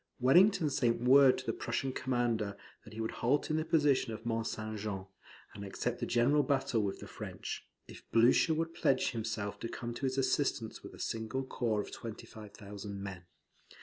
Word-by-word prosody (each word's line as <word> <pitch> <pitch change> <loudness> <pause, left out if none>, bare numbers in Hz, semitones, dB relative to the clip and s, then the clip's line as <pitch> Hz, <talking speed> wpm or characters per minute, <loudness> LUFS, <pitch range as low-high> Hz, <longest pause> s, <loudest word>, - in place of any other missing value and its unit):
Wellington 160 +5 +5
sent 120 -3 +1
word 130 +1 +7
to 130 - -7
the - - -1
Prussian 135 - -2
commander 120 -6 -1 0.3
that 110 - -13
he 110 - -8
would 110 0 -2
halt 145 +5 +2
in 155 - +1
the 155 - +1
position 145 -7 +2
of 110 +1 -7
Mont 115 -1 -1
St. 110 0 -4
Jean, 100 -2 -4 0.5
and 100 - -8
accept 115 +5 -3
a - - -1
general 125 +5 +3
battle 135 -4 +1
with 100 -2 -3
the - - -8
French, - - -6 0.2
if - - -11
Blucher 120 +7 +5
would 165 +1 -2
pledge 135 - +2
himself 110 -3 -3
to 115 - -4
come 120 -1 -5
to 135 +3 -2
his 130 +1 -2
assistance 130 -4 0
with - - -10
a - - -15
single 115 +4 -2
corps 115 -5 -1
of - - -9
25,000 105 -2 -8
men. 95 -3 -7
120 Hz, 185 wpm, -33 LUFS, 110-135 Hz, 0.5 s, word